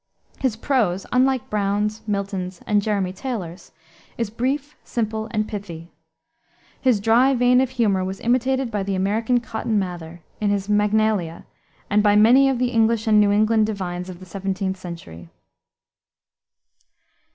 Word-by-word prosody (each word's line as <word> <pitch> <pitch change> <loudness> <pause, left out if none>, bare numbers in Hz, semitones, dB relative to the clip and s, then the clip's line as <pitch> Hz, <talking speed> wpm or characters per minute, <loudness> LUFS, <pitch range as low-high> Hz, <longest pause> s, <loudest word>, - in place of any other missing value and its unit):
His 260 -5 0
prose, 220 -7 0
unlike 260 0 +2
Browne's, 210 +1 -1
Milton's, 195 -3 -3
and 210 -1 +2
Jeremy 200 -3 -1
Taylor's, 190 -6 -6 0.5
is 230 -3 -2
brief, 270 +6 -2
simple, 220 -1 -3
and 215 -1 -1
pithy. 175 -6 -7 0.9
His 250 -6 +3
dry 235 +6 +4
vein 250 +1 +4
of 265 - 0
humor 215 -7 +1
was 190 +1 -4
imitated 255 +1 0
by 210 -2 -1
the 195 0 -2
American 220 +6 +1
Cotton 225 -2 -2
Mather, 175 -3 -5 0.2
in 210 - 0
his 200 -1 -1
Magnalia, 210 -4 +1 0.4
and 210 0 +3
by 205 -1 +4
many 245 +6 +6
of 265 - 0
the 250 0 +1
English 225 -1 +2
and 215 -1 +4
New 205 - +4
England 215 +1 +3
divines 180 -3 -4
of 180 -1 -9
the 185 - -11
17th 190 +1 -3
century. 85 - -10
210 Hz, 145 wpm, -22 LUFS, 190-235 Hz, 0.9 s, many